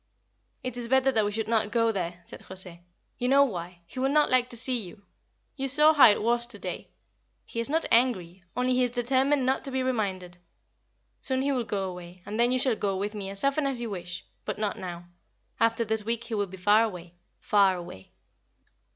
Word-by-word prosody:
"It 255 Hz, -1 st, -4 dB
is 240 Hz, -1 st, -3 dB
better 265 Hz, +2 st, +3 dB
that 220 Hz, -4 st, +2 dB
we 205 Hz, -, -1 dB
should 220 Hz, +1 st, -3 dB
not 220 Hz, -2 st, +1 dB
go 230 Hz, 0 st, +2 dB
there," 180 Hz, -3 st, -4 dB
said -, -, -10 dB
José. 185 Hz, -2 st, 0 dB, 0.4 s
"You 245 Hz, -, 0 dB
know 280 Hz, +1 st, +6 dB
why. 175 Hz, -7 st, -5 dB
He 255 Hz, -, -9 dB
will 265 Hz, +1 st, +1 dB
not 300 Hz, +1 st, +3 dB
like 250 Hz, -1 st, +3 dB
to 240 Hz, -, -4 dB
see 250 Hz, +1 st, +1 dB
you. 200 Hz, 0 st, -10 dB, 0.5 s
You 270 Hz, -1 st, -2 dB
saw 300 Hz, +4 st, +6 dB
how 290 Hz, -6 st, +8 dB
it 205 Hz, -, +1 dB
was 240 Hz, +1 st, +1 dB
to 235 Hz, -4 st, -5 dB
day. -, -, -6 dB, 0.6 s
He 230 Hz, -, -6 dB
is 230 Hz, -, +1 dB
not 320 Hz, +2 st, +1 dB
angry, 195 Hz, -7 st, +1 dB, 0.2 s
only 250 Hz, +1 st, +1 dB
he 255 Hz, -, +2 dB
is 245 Hz, -, +1 dB
determined 260 Hz, +3 st, +1 dB
not 265 Hz, +1 st, 0 dB
to -, -, 0 dB
be 260 Hz, -1 st, -1 dB
reminded. 190 Hz, -8 st, -3 dB, 0.8 s
Soon 260 Hz, 0 st, +1 dB
he 280 Hz, -, +1 dB
will 250 Hz, -4 st, -1 dB
go 195 Hz, -3 st, -2 dB
away, 180 Hz, 0 st, -10 dB
and 210 Hz, +3 st, -5 dB
then 240 Hz, +1 st, +4 dB
you 255 Hz, -, +2 dB
shall 255 Hz, -2 st, +2 dB
go 195 Hz, -2 st, -2 dB
with 205 Hz, +2 st, -3 dB
me 200 Hz, -2 st, -5 dB
as 195 Hz, 0 st, -4 dB
often 275 Hz, +1 st, +1 dB
as 265 Hz, -3 st, -1 dB
you 235 Hz, -2 st, -4 dB
wish; 180 Hz, -1 st, -6 dB, 0.2 s
but -, -, -4 dB
not 210 Hz, -1 st, -1 dB
now. 175 Hz, -1 st, -7 dB, 0.5 s
After 230 Hz, +1 st, +2 dB
this 220 Hz, 0 st, 0 dB
week 230 Hz, +1 st, -1 dB
he 235 Hz, -, -7 dB
will 205 Hz, -2 st, 0 dB
be 190 Hz, +1 st, -11 dB
far 205 Hz, +4 st, +4 dB
away 180 Hz, -6 st, -6 dB, 0.3 s
far 200 Hz, -2 st, +3 dB
away." 95 Hz, -, -10 dB
225 Hz, 220 wpm, -27 LUFS, 190-255 Hz, 0.8 s, how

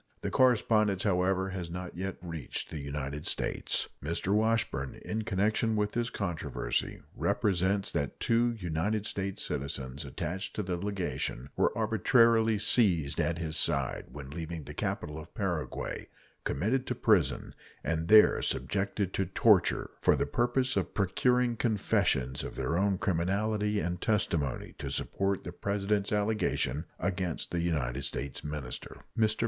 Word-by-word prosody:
The -, -, -2 dB
correspondence, 110 Hz, -6 st, +3 dB
however, 95 Hz, -1 st, +2 dB
has 90 Hz, -3 st, -5 dB
not 90 Hz, +1 st, -6 dB
yet 95 Hz, +2 st, -4 dB
reached 80 Hz, -5 st, -4 dB
the 80 Hz, -, -4 dB
United 70 Hz, +1 st, -4 dB
States. -, -, 0 dB, 0.2 s
Mr. 85 Hz, +5 st, 0 dB
Washburn, 105 Hz, -11 st, +1 dB
in 110 Hz, +1 st, -2 dB
connection 110 Hz, +3 st, +1 dB
with 105 Hz, 0 st, +1 dB
this 120 Hz, 0 st, -1 dB
controversy, 85 Hz, -, -2 dB
represents 95 Hz, 0 st, +1 dB
that 70 Hz, -, -2 dB
two 120 Hz, +1 st, +3 dB
United 100 Hz, +2 st, -1 dB
States 95 Hz, -2 st, -2 dB
citizens 70 Hz, 0 st, -3 dB
attached 85 Hz, +8 st, -4 dB
to 105 Hz, -, -1 dB
the 90 Hz, -1 st, -2 dB
legation 85 Hz, -9 st, -3 dB
were -, -, +3 dB
arbitrarily 115 Hz, -2 st, +4 dB
seized 90 Hz, -, +2 dB
at 85 Hz, -1 st, +1 dB
his 80 Hz, -2 st, -2 dB
side, -, -, +1 dB
when 70 Hz, -2 st, -8 dB
leaving 80 Hz, 0 st, -5 dB
the -, -, -8 dB
capital 75 Hz, +1 st, -3 dB
of 80 Hz, -, -12 dB
Paraguay, 90 Hz, -6 st, -3 dB, 0.4 s
committed 120 Hz, -, 0 dB
to 125 Hz, -, -1 dB
prison, 105 Hz, -, +2 dB, 0.3 s
and 80 Hz, +2 st, -1 dB
there 105 Hz, +3 st, +7 dB
subjected 100 Hz, -1 st, 0 dB
to 95 Hz, -, 0 dB
torture 95 Hz, 0 st, +3 dB
for -, -, +5 dB
the -, -, 0 dB
purpose 125 Hz, +2 st, +1 dB
of -, -, -1 dB
procuring 120 Hz, +5 st, +2 dB
confessions 100 Hz, -, +1 dB
of -, -, -6 dB
their 80 Hz, -, -1 dB
own 95 Hz, +1 st, +2 dB
criminality 105 Hz, +4 st, 0 dB
and 85 Hz, +1 st, -2 dB
testimony 85 Hz, -, 0 dB
to -, -, -4 dB
support 100 Hz, 0 st, -1 dB
the -, -, -5 dB
President's 100 Hz, 0 st, -1 dB
allegation 105 Hz, -, 0 dB
against 90 Hz, -4 st, -2 dB
the 85 Hz, -, 0 dB
United 70 Hz, -7 st, -1 dB
States 70 Hz, 0 st, -4 dB
minister. 75 Hz, -4 st, -6 dB
Mr. 110 Hz, -1 st, +3 dB
95 Hz, 140 wpm, -30 LUFS, 80-105 Hz, 0.4 s, there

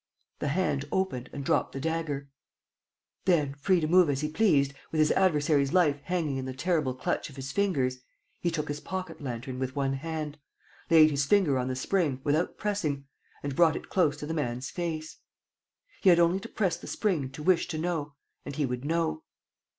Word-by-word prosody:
The -, -, -2 dB
hand 145 Hz, -3 st, 0 dB
opened 160 Hz, -10 st, -1 dB
and 140 Hz, -, -6 dB
dropped -, -, +1 dB
the 135 Hz, -, -4 dB
dagger. 150 Hz, -2 st, -2 dB, 1.0 s
Then, 155 Hz, -7 st, +3 dB
free 175 Hz, +6 st, +2 dB
to 155 Hz, -, 0 dB
move 180 Hz, -1 st, +5 dB
as 140 Hz, 0 st, 0 dB
he 150 Hz, -, -1 dB
pleased, 150 Hz, -7 st, +3 dB, 0.2 s
with 160 Hz, -, -2 dB
his 155 Hz, -1 st, +4 dB
adversary's 150 Hz, -6 st, +2 dB
life 155 Hz, -6 st, +3 dB
hanging 165 Hz, -6 st, -1 dB
in 130 Hz, -, -3 dB
the 130 Hz, -1 st, -5 dB
terrible 155 Hz, -4 st, 0 dB
clutch 130 Hz, -, -2 dB
of 140 Hz, -, -13 dB
his 135 Hz, 0 st, -5 dB
fingers, 140 Hz, -10 st, 0 dB, 0.4 s
he 175 Hz, -, 0 dB
took 160 Hz, -3 st, -2 dB
his 145 Hz, 0 st, -3 dB
pocket 185 Hz, -1 st, -5 dB
lantern 130 Hz, 0 st, -5 dB
with 130 Hz, +1 st, -3 dB
one 135 Hz, -1 st, 0 dB
hand, 150 Hz, +1 st, -4 dB, 0.5 s
laid 155 Hz, -2 st, +7 dB
his 140 Hz, 0 st, +1 dB
finger 170 Hz, -10 st, +4 dB
on 125 Hz, -, -1 dB
the 130 Hz, -, -2 dB
spring, 145 Hz, -1 st, 0 dB
without 155 Hz, +4 st, 0 dB
pressing, 160 Hz, -10 st, -2 dB, 0.4 s
and 140 Hz, -1 st, -3 dB
brought 165 Hz, 0 st, +5 dB
it -, -, -7 dB
close 170 Hz, -6 st, +2 dB
to -, -, -6 dB
the 160 Hz, -, -3 dB
man's 130 Hz, -4 st, -2 dB
face. 160 Hz, -3 st, -4 dB, 0.8 s
He 195 Hz, -, +6 dB
had 175 Hz, -, +7 dB
only 170 Hz, +2 st, +4 dB
to -, -, -9 dB
press 185 Hz, -5 st, 0 dB
the -, -, -11 dB
spring 170 Hz, -11 st, 0 dB
to 150 Hz, -, -7 dB
wish 180 Hz, 0 st, +3 dB
to 170 Hz, -3 st, -4 dB
know 155 Hz, -3 st, -2 dB, 0.3 s
and 145 Hz, -, -6 dB
he 150 Hz, -, +1 dB
would 125 Hz, 0 st, -3 dB
know. 165 Hz, -, 0 dB
150 Hz, 195 wpm, -28 LUFS, 140-175 Hz, 1.0 s, laid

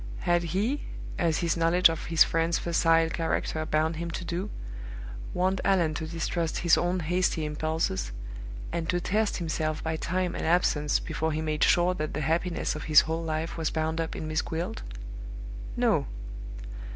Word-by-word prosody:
Had 175 Hz, 0 st, +3 dB
he 200 Hz, -, 0 dB, 0.4 s
as 165 Hz, -4 st, +2 dB
his 165 Hz, -, +2 dB
knowledge 170 Hz, +2 st, +5 dB
of 165 Hz, -1 st, -3 dB
his 165 Hz, -1 st, +6 dB
friend's 165 Hz, +1 st, +1 dB
facile 165 Hz, -1 st, +3 dB
character 160 Hz, -1 st, -1 dB
bound 155 Hz, +1 st, +1 dB
him 170 Hz, +1 st, -3 dB
to 175 Hz, +2 st, -4 dB
do 180 Hz, +5 st, -2 dB, 0.8 s
warned 185 Hz, +1 st, +1 dB
Allan 180 Hz, -5 st, +3 dB
to 160 Hz, +1 st, -3 dB
distrust 165 Hz, 0 st, -1 dB
his 170 Hz, -, +7 dB
own 175 Hz, +1 st, +1 dB
hasty 170 Hz, -1 st, +1 dB
impulses, 150 Hz, -, -1 dB, 0.6 s
and 165 Hz, -1 st, -2 dB
to 175 Hz, -, +2 dB
test 210 Hz, +4 st, +1 dB
himself 155 Hz, -2 st, -2 dB
by 160 Hz, 0 st, -1 dB
time 180 Hz, +2 st, -1 dB
and -, -, -3 dB
absence, 160 Hz, -3 st, +3 dB
before 160 Hz, 0 st, -2 dB
he 155 Hz, +1 st, -1 dB
made 155 Hz, -1 st, 0 dB
sure 175 Hz, +1 st, +4 dB
that 155 Hz, -5 st, -3 dB
the 150 Hz, -, -1 dB
happiness 165 Hz, +3 st, 0 dB
of 155 Hz, -, -5 dB
his 155 Hz, -1 st, +8 dB
whole 160 Hz, +1 st, -2 dB
life 160 Hz, +1 st, -2 dB
was 160 Hz, -, +1 dB
bound 160 Hz, +1 st, -1 dB
up 165 Hz, -, -3 dB
in 155 Hz, -, -4 dB
Miss 155 Hz, 0 st, +1 dB
Gwilt? 165 Hz, +1 st, -3 dB, 1.0 s
No. -, -, +3 dB
165 Hz, 170 wpm, -28 LUFS, 155-175 Hz, 1.0 s, his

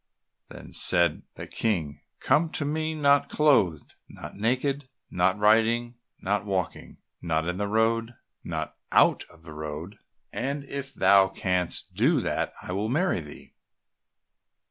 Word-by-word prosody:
Then -, -, -12 dB
said 85 Hz, -3 st, +4 dB
the -, -, -7 dB
King, 80 Hz, -10 st, -2 dB, 0.2 s
"Come 155 Hz, +5 st, +2 dB
to 145 Hz, -, -1 dB
me 155 Hz, +2 st, -2 dB
not 140 Hz, -1 st, +3 dB
clothed, 115 Hz, -, +2 dB, 0.2 s
not -, -, -10 dB
naked, 130 Hz, +5 st, -1 dB, 0.2 s
not 90 Hz, +2 st, +1 dB
riding, 115 Hz, +3 st, +2 dB, 0.3 s
not 100 Hz, +1 st, -1 dB
walking, 95 Hz, -4 st, -4 dB, 0.2 s
not 80 Hz, -1 st, -1 dB
in 90 Hz, +1 st, -2 dB
the 100 Hz, +1 st, -2 dB
road, 110 Hz, +2 st, +1 dB
and 120 Hz, +1 st, -17 dB, 0.3 s
not -, -, -4 dB, 0.2 s
out -, -, +4 dB
of 85 Hz, -1 st, -21 dB
the 80 Hz, -2 st, -11 dB
road, 75 Hz, +6 st, -7 dB, 0.3 s
and 140 Hz, +3 st, -3 dB
if 140 Hz, -1 st, -7 dB
thou 100 Hz, -2 st, +5 dB
canst 90 Hz, -2 st, -2 dB
do -, -, +2 dB
that -, -, -2 dB
I -, -, -6 dB
will 100 Hz, +4 st, -2 dB
marry 160 Hz, -, +1 dB
thee." 75 Hz, -2 st, -12 dB
105 Hz, 145 wpm, -26 LUFS, 90-135 Hz, 0.3 s, thou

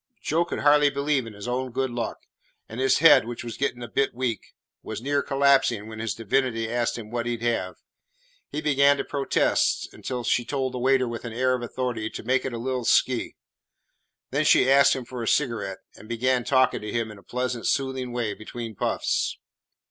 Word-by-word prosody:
Joe 165 Hz, +3 st, 0 dB
could -, -, -4 dB
hardly 145 Hz, 0 st, +5 dB
believe 140 Hz, -2 st, 0 dB
in 110 Hz, -, -9 dB
his 100 Hz, +2 st, -8 dB
own 125 Hz, +1 st, -2 dB
good 130 Hz, +1 st, -1 dB
luck, 120 Hz, -1 st, -4 dB, 0.4 s
and 110 Hz, -, -8 dB
his 130 Hz, 0 st, +3 dB
head, 150 Hz, -7 st, +6 dB
which 120 Hz, 0 st, -6 dB
was 120 Hz, -1 st, -6 dB
getting 125 Hz, -3 st, -2 dB
a -, -, -5 dB
bit 135 Hz, +3 st, 0 dB
weak, 120 Hz, -3 st, -3 dB, 0.3 s
was -, -, -6 dB
near 140 Hz, +4 st, 0 dB
collapsing 135 Hz, -7 st, +2 dB
when 110 Hz, 0 st, -8 dB
his 110 Hz, -2 st, -2 dB
divinity 115 Hz, 0 st, 0 dB
asked 120 Hz, +1 st, -1 dB
him 110 Hz, -2 st, -9 dB
what 120 Hz, 0 st, -2 dB
he 120 Hz, -1 st, -1 dB
'd 115 Hz, -, -11 dB
have? 115 Hz, -6 st, -1 dB, 0.7 s
He 150 Hz, -, -4 dB
began 140 Hz, -1 st, +4 dB
to -, -, -2 dB
protest, 140 Hz, -2 st, 0 dB
until 125 Hz, -2 st, -5 dB
she 120 Hz, -, +1 dB
told 130 Hz, +1 st, -2 dB
the 125 Hz, -, -4 dB
waiter 130 Hz, 0 st, +3 dB
with 115 Hz, -1 st, -5 dB
an 120 Hz, -2 st, -6 dB
air 130 Hz, +2 st, +1 dB
of 125 Hz, -, -2 dB
authority 120 Hz, -2 st, -3 dB
to -, -, -8 dB
make 130 Hz, +3 st, +1 dB
it 135 Hz, -, -2 dB
a 120 Hz, -, -5 dB
little 125 Hz, +1 st, -2 dB
"'skey." 125 Hz, +1 st, +2 dB, 1.0 s
Then -, -, +1 dB
she -, -, +5 dB
asked 140 Hz, 0 st, +6 dB
him 130 Hz, -2 st, -5 dB
for 125 Hz, 0 st, -7 dB
a 115 Hz, -, -3 dB
cigarette, 110 Hz, -9 st, 0 dB
and 105 Hz, -, -14 dB
began 125 Hz, +2 st, +1 dB
talking 130 Hz, -1 st, +2 dB
to 105 Hz, 0 st, -5 dB
him 115 Hz, -1 st, -2 dB
in 105 Hz, -, -12 dB
a -, -, -19 dB
pleasant, 125 Hz, -1 st, -3 dB
soothing 130 Hz, -2 st, -1 dB
way 120 Hz, -3 st, -2 dB
between 115 Hz, +1 st, -7 dB
puffs. -, -, -1 dB
125 Hz, 210 wpm, -25 LUFS, 115-135 Hz, 1.0 s, head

